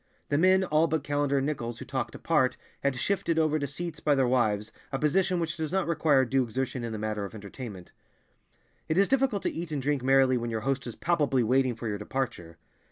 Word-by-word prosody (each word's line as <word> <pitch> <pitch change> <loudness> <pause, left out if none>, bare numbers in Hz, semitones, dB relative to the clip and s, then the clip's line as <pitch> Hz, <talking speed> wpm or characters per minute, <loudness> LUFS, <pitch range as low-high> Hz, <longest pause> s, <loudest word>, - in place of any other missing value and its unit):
The 145 - +2
men, 185 +2 +5
all 160 -2 +3
but 160 -3 -1
Callender 145 -1 0
and 135 - +1
Nichols, 120 -6 -3
who - - -8
talked 130 -2 -3
apart, 135 -6 +1 0.2
had 140 -1 +1
shifted 165 +4 0
over 155 -1 +2
to 140 - -2
seats 155 +2 -5
by 150 -2 +2
their 135 -2 +2
wives, 110 -4 +1 0.2
a 135 - -1
position 175 +5 +2
which 165 -1 -2
does 160 -1 -3
not 190 -1 +1
require 155 -5 +3
due 135 +2 +2
exertion 125 +1 -3
in 115 - -3
the 110 - -4
matter 105 -1 -2
of 100 +2 -7
entertainment. 100 -2 -9 1.0
It 160 - +1
is 195 0 +5
difficult 260 -6 +1
to - - -1
eat 165 -1 -5
and 150 - -1
drink 140 0 0
merrily 130 0 +4
when 120 0 -3
your 110 -1 -2
host 130 0 -1
is 120 - -6
palpably 145 -7 +1
waiting 130 +1 +2
for 115 +1 -5
your 105 -2 -2
departure. 105 -8 -4
135 Hz, 225 wpm, -28 LUFS, 120-160 Hz, 1.0 s, men